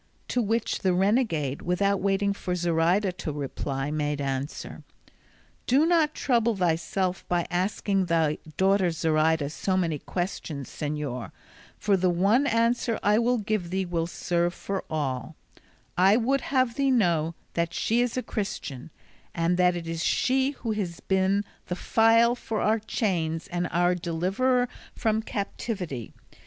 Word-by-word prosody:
To 250 - +1
which 225 +1 0
the 185 -2 +1
renegade, 185 - +1
without 200 +3 +1
waiting 200 +1 +1
for 180 -2 -3
Zoraida 175 +3 +2
to 175 -3 -5
reply, 140 -1 -3
made 150 -1 -1
answer, 135 +1 -4 0.9
"Do 275 +5 +4
not 325 -3 +3
trouble 235 -4 +2
thyself 180 +1 0
by 175 -1 +1
asking 190 +1 0
thy 160 -3 +1 0.2
daughter 190 -1 +3
Zoraida 160 -2 +1
so 185 +4 -1
many 165 -5 0
questions, 165 -6 -4
señor, 145 -8 -4 0.5
for 205 -2 +2
the 185 -1 +2
one 200 +11 +3
answer 230 0 +1
I 210 +2 +4
will 245 +1 +2
give 210 -4 -2
thee 190 +1 -1
will 170 -2 -1
serve 175 0 -1
for 195 -1 -4
all; 145 -1 -3 0.6
I 190 +4 +5
would 260 +3 +1
have 255 -4 +1
thee 275 -1 +2
know 170 -9 +2 0.2
that 170 0 0
she 230 +7 +1
is 245 0 -1
a 255 - -1
Christian, 150 - -5 0.5
and 170 +1 +1
that 180 -1 +4
it 170 -1 -5
is 165 0 -3
she 265 +1 +2 0.2
who 225 - +1
has 190 -6 -3
been 190 +1 +1 0.2
the 180 - -2
file 230 +4 +4
for 225 -3 -4
our 220 +1 +2
chains 170 -7 -1
and 175 0 -1
our 175 +1 +2
deliverer 190 +10 +1 0.3
from 220 -1 +1
captivity. 195 - -4
185 Hz, 145 wpm, -26 LUFS, 165-220 Hz, 0.9 s, I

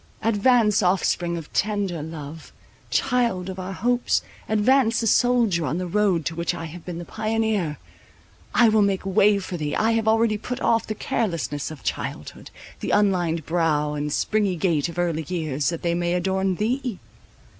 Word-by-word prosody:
advance, 220 -1 +3
offspring 180 -2 +1
of 160 -3 -9
tender 200 -5 -1
love, 155 0 -8 0.4
child 235 -8 0
of 190 - -8
our 185 +1 -5
hopes; 245 +5 +1 0.3
advance 230 +2 +3
a - - 0
soldier 230 -7 +3
on 150 +2 -1
the 185 - -2
road 185 -3 +1
to 170 - -1
which 170 0 -2
I 165 - -6
have 165 +1 -9
been 175 -2 -6
the 175 - -6
pioneer! 215 -8 -1 0.7
I 240 - +5
will 215 0 +4
make 195 -2 +1
way 200 +1 +4
for 185 -2 -5
thee. 150 -2 -2
I 220 +1 +2
have 225 -1 0
already 220 -1 +3
put 250 +4 -5
off 230 -1 +1
the 215 - -3
carelessness 170 -10 -2
of 155 -3 -10
childhood, - - -5 0.3
the - - -4
unlined 175 -6 +1
brow, 155 -3 +1
and 150 0 -3
springy 205 +2 +1
gait 165 -4 0
of 170 - -9
early 170 -2 0
years, 155 -5 -1
that 170 -1 -5
they 170 -1 +1
may 175 0 0
adorn 190 +1 0
thee. 235 +2 -1
190 Hz, 175 wpm, -24 LUFS, 165-220 Hz, 0.7 s, I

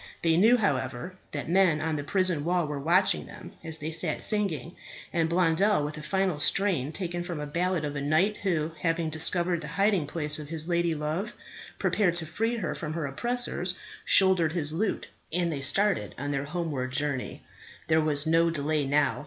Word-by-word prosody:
They 165 -1 +3
knew, 225 +8 +5
however, 150 - -2 0.2
that 145 - -4
men 175 -2 +3
on 160 0 -1
the 145 - -3
prison 180 -1 0
wall 175 +1 +1
were 150 -1 -4
watching 175 +7 +2
them - - -11
as 160 -1 +1
they 155 +1 -4
sat 160 -1 +1
singing, 185 - 0 0.4
and 165 -2 +1
Blondel, 170 0 +2
with 150 - -5
a 150 - -8
final 185 +1 -1
strain 170 -5 +1
taken 175 0 -4
from 175 -3 -5
a 150 - -4
ballad 170 +2 -1
of 145 0 -4
a 140 - -3
knight 160 +9 +2
who, 165 -5 -1
having 165 -1 0
discovered 170 +2 +1
the 150 - -7
hiding 190 -1 +1
place 150 -1 0
of 150 -1 -8
his 160 0 0
ladylove, 170 +3 -1 0.4
prepared 180 -5 +1
to 170 -2 0
free 225 +8 -1
her 200 -9 -3
from 155 -2 -5
her 165 -2 -3
oppressors, 185 - -1 0.3
shouldered 185 -5 +5
his 155 -3 -1
lute, 200 +6 -1 0.3
and 170 0 0
they 140 - -4
started 195 - +1
on 145 +2 -3
their 140 0 -2
homeward 150 -5 -3
journey. 140 -1 -3 0.4
There 160 0 +3
was 150 -1 +1
no 165 +1 +3
delay 150 -2 0
now. 140 -4 +1
165 Hz, 185 wpm, -27 LUFS, 150-180 Hz, 0.4 s, knew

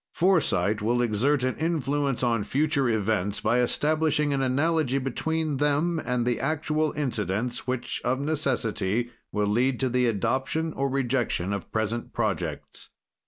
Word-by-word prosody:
"Foresight 115 - +2
will 120 +3 +1
exert 125 +5 +1
an 130 - 0
influence 145 -5 0
on 115 -3 +1
future 140 +1 +1
events 105 -2 0
by 120 - +2
establishing 150 +3 +1
an 135 - 0
analogy 140 +1 +1
between 150 +3 -1
them 150 +4 +1
and 125 -1 -1
the 120 -1 0
actual 155 +1 0
incidents 120 - -2
which, 125 -1 -2
of 125 +2 0
necessity, 120 -6 -1 0.2
will 105 -1 0
lead 120 +5 +1
to 130 - +1
the 125 0 +2
adoption 130 +9 -1
or 140 0 -1
rejection 125 -8 0
of 100 -5 -5
present 110 +2 -2
projects. - - -3
130 Hz, 140 wpm, -26 LUFS, 115-150 Hz, 0.2 s, Foresight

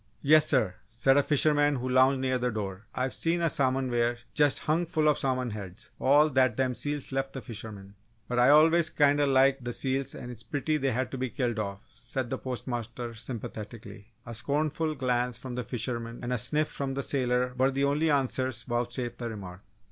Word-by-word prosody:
"Yes, 155 +2 +6
sir!" 110 -10 +2
said 115 +5 +2
a 145 - +5
fisherman 145 0 +3
who 125 0 -3
lounged 130 +1 +4
near 130 -1 0
the 125 0 0
door. 105 -2 -5
"I've 130 0 -1
seen 165 +1 0
a 165 -2 +1
salmon 130 -1 0
weir 120 0 +1 0.2
just 145 -2 +2
hung 165 +3 0
full 155 -2 +1
of 150 - +3
salmon 130 -2 -1
heads 100 -2 -8
all 145 +3 +4
that 130 -3 +2
them 130 -1 +1
seals 145 +2 -3
left 135 0 -2
the 135 - -6
fishermen!" 105 -4 -8 0.3
"But 125 0 -1
I 125 +2 +6
always 160 +3 +5
kind'a 145 0 +3
liked 135 0 +3
the 120 - -3
seals 135 +1 -1
and 120 - -7
it's 115 -2 -9
a - - -18
pity 155 +2 -1
they 135 -2 0
has 130 +3 -1
to 135 - -5
be 130 0 -1
killed 120 -3 -2
off," 100 0 -4
said 120 0 -5
the 130 - -2
postmaster 120 -2 -5
sympathetically. 110 -2 -8 0.2
A 115 - -7
scornful 155 +5 -1
glance 125 -2 0
from 130 -2 -7
the 125 0 -3
fisherman 115 0 -4
and 125 +1 -2
a 125 - 0
sniff 150 +6 +1
from 135 -1 -4
the 140 - -2
sailor 125 -2 0
were 130 +1 +3
the 135 +1 -1
only 145 +3 +2
answers 130 -4 0
vouchsafed 120 0 -3
the 120 -1 -3
remark. 95 -4 -8
130 Hz, 205 wpm, -28 LUFS, 120-140 Hz, 0.3 s, Yes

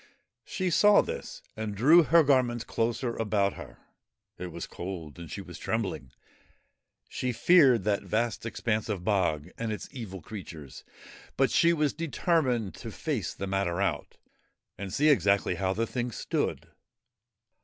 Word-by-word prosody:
She 185 -2 -2
saw 205 +4 +6
this - - -7
and 110 -2 -4
drew 150 - +7
her 165 +1 +5
garments 125 -4 +2
closer 115 +1 -1
about 100 -3 +1
her. - - -11 0.6
It 90 - -4
was - - -6
cold, 85 -4 -7
and 85 -2 -9
she - - -6
was - - -10
trembling. 65 -1 -3 1.0
She 125 - -2
feared 135 - +5
that 100 0 +1
vast 115 +1 -1
expanse 115 -1 -2
of 100 -5 -3
bog 90 -5 0
and 115 -1 -2
its 105 - -5
evil 110 -8 -7
creatures, 85 -9 -9 0.5
but - - +3
she 170 - +4
was 150 -4 +1
determined 150 - 0
to - - -7
face - - -3
the 100 - -4
matter 95 -2 -1
out 100 - -2 0.6
and 100 -1 -6
see 145 +9 +2
exactly 100 - +3
how 95 +2 -1
the 115 +4 0
thing 125 +1 -3
stood. - - -2
110 Hz, 150 wpm, -28 LUFS, 95-130 Hz, 1.0 s, drew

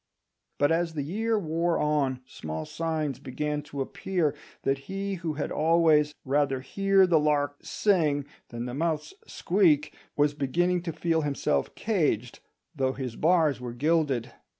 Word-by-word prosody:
But 145 +2 +3
as 165 0 0
the 145 - -1
year 220 +9 0
wore 170 -2 0
on 140 -4 0
small 80 -9 -6
signs 155 - -2
began 150 +2 -3
to 145 -1 -6
appear 160 +2 -1 0.3
that 135 0 +1
he 195 +1 -3
who 165 -3 -2
had 145 - -3
always 155 -2 +3
"rather 135 -1 +1
hear 195 +6 +3
the 170 -3 +4
lark 145 -1 +1
sing 155 -9 +1 0.2
than 120 0 -5
the 125 - -5
mouse 155 +1 -1
squeak" 170 -6 +2 0.2
was 145 0 +3
beginning 175 +6 +1
to 170 - -1
feel 160 0 0
himself 140 - -1
caged, 150 - 0 0.4
though 130 -2 0
his 130 -4 -5
bars 155 -5 +2
were 120 -1 -5
gilded. 135 -3 +1
150 Hz, 150 wpm, -27 LUFS, 135-170 Hz, 0.4 s, the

